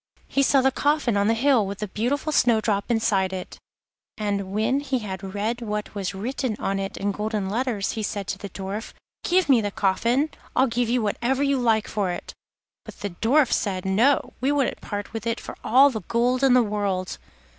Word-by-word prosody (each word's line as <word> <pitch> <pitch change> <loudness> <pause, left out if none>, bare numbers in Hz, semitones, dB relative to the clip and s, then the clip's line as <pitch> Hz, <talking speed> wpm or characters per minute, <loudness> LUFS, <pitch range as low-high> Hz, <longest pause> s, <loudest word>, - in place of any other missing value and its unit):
He 275 - +1
saw 275 0 +4
the 265 +1 +3
coffin 285 -4 +1
on 200 0 +2
the 225 - +3
hill, 255 -1 +3
with 200 0 -5
the 210 - -4
beautiful 255 +10 -1
Snowdrop 220 -6 +2
inside 205 -5 +1
it, 185 -1 -7 0.6
and 200 -3 -2
when 220 +7 +1
he 275 -2 -1
had 195 -3 -6
read 225 +4 -2
what 210 -2 -4
was 195 -2 -3
written 245 +3 -2
on 195 0 -1
it 195 0 -4
in 200 +1 -1
golden 210 -1 -2
letters, 230 -3 -1
he 225 - -4
said 205 -1 -3
to 195 - -3
the 200 - -7
Dwarf: 195 +4 -6 0.3
'Give 365 0 +2
me 260 -5 +5
the 205 - -1
coffin. 235 +10 +1 0.2
I'll 260 - +5
give 240 -1 -1
you 245 -1 +1
whatever 250 +6 0
you 280 -1 +2
like 225 -3 +2
for 205 -3 -1
it.' 175 - -5 0.5
But - - -12
the 205 -1 -3
Dwarf 250 - +2
said: 190 -3 -1
'No; 230 +9 +2
we 270 +2 +2
wouldn't 285 -3 0
part 205 0 -5
with 225 0 -4
it 230 - -1
for - - -8
all 270 +4 +6
the 220 -3 -4
gold 245 +3 0
in 265 -2 +6
the 250 - +5
world. 200 -3 -2
220 Hz, 205 wpm, -24 LUFS, 200-255 Hz, 0.6 s, all